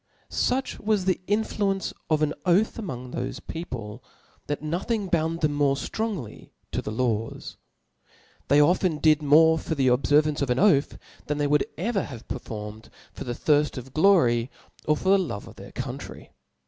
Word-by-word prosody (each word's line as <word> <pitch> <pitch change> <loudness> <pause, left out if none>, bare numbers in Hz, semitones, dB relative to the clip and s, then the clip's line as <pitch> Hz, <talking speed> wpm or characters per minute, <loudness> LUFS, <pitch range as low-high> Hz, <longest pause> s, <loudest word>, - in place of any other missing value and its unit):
Such 260 +2 -1
was 210 -3 0
the 185 -1 +1
influence 205 -2 0 0.2
of 155 -1 +2
an 150 0 +1
Oath 195 +6 +2
among 125 - -6
tho(e 125 +1 -4
people, 120 -9 -6 0.4
that 145 0 -3
nothing 195 +6 -2
bound 165 0 0
them 150 -2 0
ftronger 145 - -2 0.2
to - - -1
the - - -5
laws. 115 -1 -2 0.9
They 145 - +5
often 170 +2 +3
did 155 0 +4
niore 160 +2 +5
for 160 - -3
the 135 -3 +3
obfcrvance 145 +4 +3
of 140 - 0
an 125 - +1
oath, 170 -9 +3 0.3
than 150 - -1
they 145 - +1
would 150 0 +2
ever 200 +4 0
have 120 -7 -9
performed 110 -3 -7 0.2
for 140 - -7
the 120 -1 -3
thirft 150 0 +2
of 130 +1 -8
glory 155 -10 +4 0.4
or 150 0 +2
for 185 - -1
the 195 0 +6
love 145 - -4
of - - -13
heir - - -10
country. - - -7
150 Hz, 165 wpm, -25 LUFS, 130-185 Hz, 0.9 s, the